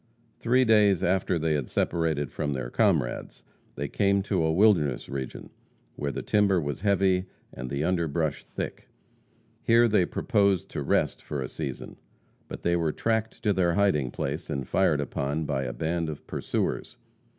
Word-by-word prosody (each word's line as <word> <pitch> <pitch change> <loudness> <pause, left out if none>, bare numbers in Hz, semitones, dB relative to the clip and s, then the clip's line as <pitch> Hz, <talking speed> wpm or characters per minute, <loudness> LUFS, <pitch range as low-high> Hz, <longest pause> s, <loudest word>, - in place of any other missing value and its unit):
Three 125 +2 +3
days 105 -5 +4
after 95 -1 +1
they 80 -1 0
had 70 -5 -2
separated 80 -5 0
from 75 - -2
their - - -4
comrades, - - 0 0.3
they 70 - -3
came 100 +4 +1
to 95 -3 0
a 80 - +2
wilderness 85 - +3
region, 65 -2 -6 0.4
where 70 -1 -2
the - - -5
timber 100 -3 +3
was 75 0 -4
heavy 95 -2 +2 0.3
and 65 +1 -6
the 70 +2 -2
underbrush 85 -3 0
thick. - - -6 0.7
Here 115 +1 +5
they 105 -5 +3
proposed 100 -6 +1
to 75 - -4
rest 70 - 0
for 75 - -5
a - - -4
season. 70 -5 -6 0.5
But - - -8
they 85 0 +2
were 85 -2 +1
tracked 110 +5 -2
to 105 - +3
their 85 -3 +2
hiding 95 -10 +2
place, 75 +8 -4
and 70 -4 -3
fired 75 - +2
upon 70 +2 -2
by 70 -2 -1
a 60 - -3
band 80 +3 -2
of 75 - -7
pursuers. - - -3
80 Hz, 165 wpm, -27 LUFS, 70-100 Hz, 0.7 s, Here